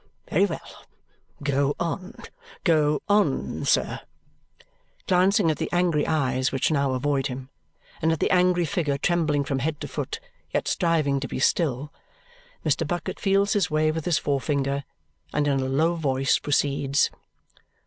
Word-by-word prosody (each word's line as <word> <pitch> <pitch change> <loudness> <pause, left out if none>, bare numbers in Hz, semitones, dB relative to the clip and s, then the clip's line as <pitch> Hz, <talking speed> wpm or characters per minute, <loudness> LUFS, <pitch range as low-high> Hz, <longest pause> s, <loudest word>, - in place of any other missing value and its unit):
Very - - +4
well. - - -8 0.6
Go 140 0 +1
on. 185 +6 -3 0.5
Go 150 -4 +2
on, 205 -9 +1
sir!" - - +1 1.1
Glancing 180 -2 +3
at 155 - -3
the - - -2
angry 175 -4 +2
eyes 130 -4 +1
which 135 +3 0
now 140 -3 +1
avoid 140 +1 0
him 130 -1 -7 0.5
and 160 0 +2
at 160 - -1
the - - +1
angry 180 -1 +3
figure 150 -3 -1
trembling 150 -2 +1
from 135 -1 -2
head 150 +3 -2
to - - -5
foot, 450 - -4 0.3
yet - - -1
striving 155 -6 +1
to 135 - -4
be - - -5
still, 145 0 0 0.7
Mr. - - +1
Bucket - - -3
feels 200 0 +2
his 200 -5 +1
way 155 0 +2
with 160 -1 -4
his 170 -4 +2
forefinger 140 -1 -1 0.5
and 150 -1 +1
in 140 -1 +2
a 130 - -1
low 155 +6 +2
voice 135 -5 +1
proceeds. 140 -1 +1
150 Hz, 150 wpm, -25 LUFS, 140-170 Hz, 1.1 s, Very